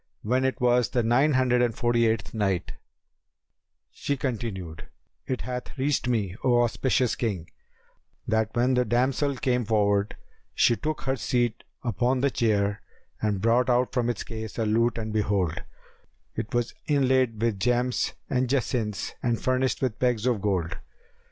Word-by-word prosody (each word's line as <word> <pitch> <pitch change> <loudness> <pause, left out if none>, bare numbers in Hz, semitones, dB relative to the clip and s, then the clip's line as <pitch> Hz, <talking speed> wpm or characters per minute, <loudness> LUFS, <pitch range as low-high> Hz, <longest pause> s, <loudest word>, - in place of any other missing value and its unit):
When 125 +4 +1
it 130 0 -1
was 125 -1 +3
the 120 - 0
Nine 130 +7 +3
Hundred 125 -1 +3
and 120 -3 +1
Forty 120 -1 +2
eighth 110 -1 -1
Night, 100 -5 -1 1.2
She 140 - -2
continued, 105 - -4 0.4
It 130 - -2
hath 125 +1 -6
reached 135 -1 0
me, 105 -7 0
O 120 -1 +4
auspicious 125 +1 +1
King, 95 -8 -3 0.8
that 110 -1 +1
when 125 +2 +2
the 125 0 +3
damsel 130 +4 +1
came 125 -2 0
forward, 105 -2 +1 0.4
she 120 - +4
took 155 +5 -3
her 130 0 0
seat 120 -2 -1 0.2
upon 125 +1 0
the 140 0 +2
chair 105 -4 +1 0.4
and 105 -3 0
brought 120 +3 +3
out 125 0 +2
from 120 -2 +1
its 120 - -2
case 110 -2 -7
a 115 - 0
lute 115 +3 +2
and 110 -1 -4
behold, 100 -6 0 0.7
it 110 -1 -4
was 120 -1 -1
inlaid 130 -5 +2
with 110 -3 0
gems 125 +4 +1
and 125 -1 0
jacinths 120 -5 -1
and 120 -3 0
furnished 130 +1 0
with 125 -2 -1
pegs 120 -3 +1
of 120 -5 +1
gold. 90 -5 -1
120 Hz, 155 wpm, -26 LUFS, 110-125 Hz, 1.2 s, O